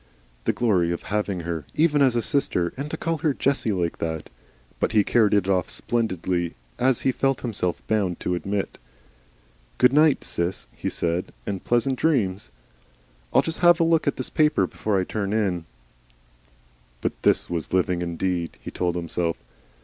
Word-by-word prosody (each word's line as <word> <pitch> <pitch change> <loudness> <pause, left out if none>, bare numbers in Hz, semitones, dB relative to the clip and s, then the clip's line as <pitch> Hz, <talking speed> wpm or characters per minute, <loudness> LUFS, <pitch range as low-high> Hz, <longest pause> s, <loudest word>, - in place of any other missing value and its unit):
The - - +3
glory 95 -8 +2
of 85 - -3
having 100 -3 -2
her, 85 -2 -3
even 150 -2 +3
as 130 -3 +4
a 120 - +1
sister! 90 - 0
and 140 +3 -5
to 160 - -4
call 165 -1 -2
her 150 -3 +1
Jessie 135 -5 +1
like 85 -4 -1
that! 80 -2 -4 0.5
But - - 0
he 105 -2 +5
carried 110 -1 +3
it 100 -2 +2
off 95 -3 +1
splendidly, 95 -7 -1 0.2
as 130 0 +3
he 135 - +2
felt 135 0 0
himself 100 -7 -2
bound 100 -5 0
to 90 - -1
admit. 100 +3 -3 1.0
"Good 125 +1 +5
night, 150 0 +4
Sis," 85 -7 -2
he - - -3
said, 85 +1 -1
"and 95 -2 -4
pleasant 125 +2 +1
dreams. 110 - +1 0.8
I'll - - +4
just 165 +2 -3
'ave 175 -1 +7
a 165 - +4
look 165 -2 +2
at 140 - +2
this 130 - -4
paper 155 0 +3
before 105 -3 -1
I - - +1
turn 100 +1 -3
in." 95 -6 0 1.4
But - - -3
this - - +3
was 85 -3 -3
living 90 -1 +1
indeed! 85 0 -2
he - - -8
told 90 -1 -1
himself. 85 -1 -1
100 Hz, 170 wpm, -24 LUFS, 90-135 Hz, 1.4 s, ave